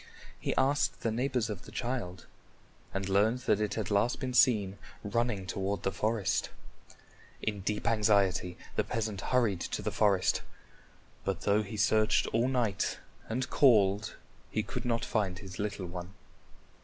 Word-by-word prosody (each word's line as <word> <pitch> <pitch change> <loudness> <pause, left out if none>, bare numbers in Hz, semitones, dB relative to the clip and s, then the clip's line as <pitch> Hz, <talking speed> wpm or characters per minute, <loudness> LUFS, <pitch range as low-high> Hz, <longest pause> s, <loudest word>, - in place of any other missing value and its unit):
He - - -2
asked 140 +2 +1
the 115 - 0
neighbors 125 0 0
of 105 -5 -6
the - - -11
child 120 -8 -4 0.7
and 95 0 -3
learned 105 +6 +2
that 105 -5 +2
it 105 - -1
had 110 -1 -3
last 100 +4 +2
been 130 -1 -3
seen 105 -6 +4 0.2
running 110 -2 -1
toward 95 +1 -2
the 95 - +1
forest. 110 -1 0 0.9
In 105 -2 -1
deep 105 +2 -2
anxiety, 100 -5 +2 0.2
the - - +2
peasant 110 -4 -3
hurried 115 -8 +1
to - - -3
the - - -1
forest, 100 -3 +2 0.8
but - - -2
though 105 +1 +3
he 105 +1 -6
searched 110 0 +3
all 115 +3 +3
night 120 -6 0 0.3
and 125 +3 -2
called, 105 -6 +4 0.3
he - - -1
could - - -5
not 115 -1 0
find 100 -5 -1
his 95 -1 -9
little 100 -2 -2
one. 90 +2 -7
105 Hz, 155 wpm, -31 LUFS, 100-115 Hz, 0.9 s, seen